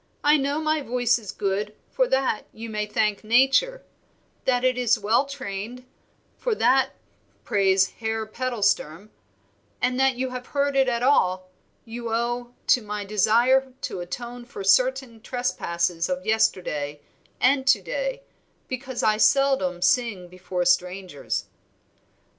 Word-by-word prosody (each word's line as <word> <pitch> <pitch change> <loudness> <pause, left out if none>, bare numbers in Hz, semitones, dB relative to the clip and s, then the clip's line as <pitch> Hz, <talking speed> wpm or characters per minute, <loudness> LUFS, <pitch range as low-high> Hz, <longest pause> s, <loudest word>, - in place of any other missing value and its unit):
I 295 +1 +5
know 285 +1 0
my 310 -1 0
voice 245 -2 +1
is 210 -4 -7
good, 205 +1 -2 0.2
for - - +2
that 265 - 0
you 225 0 -8
may 210 -1 -2
thank 210 0 0
nature; 270 - +3 0.6
that 250 -1 +2
it 255 -1 +3
is 245 -1 +2
well 220 +6 +2
trained, 250 -2 -6 0.5
for 480 -3 0
that 260 - +3 0.5
praise 190 -1 +2
Herr 220 -1 -2
Pedalsturm; 215 -6 -1 0.7
and 250 +1 0
that 265 -1 +3
you 255 +1 -3
have 250 0 -7
heard 280 -1 0
it 265 -1 +3
at 235 0 -1
all, 185 -9 +2 0.3
you 230 0 -6
owe 240 +1 -2
to 250 - +4
my 210 -1 -5
desire 240 +6 +3
to - - -4
atone 240 +7 -6
for 240 -4 -8
certain 250 +3 +2
trespasses 170 -9 -2
of 275 0 -3
yesterday 165 -9 0 0.4
and 265 +1 +2
to - - +5
day, - - -3 0.4
because 255 0 -4
I 215 0 +3
seldom 215 -7 +2
sing 210 -5 +1
before 180 0 -4
strangers." 180 -2 -1
240 Hz, 135 wpm, -24 LUFS, 200-265 Hz, 0.7 s, I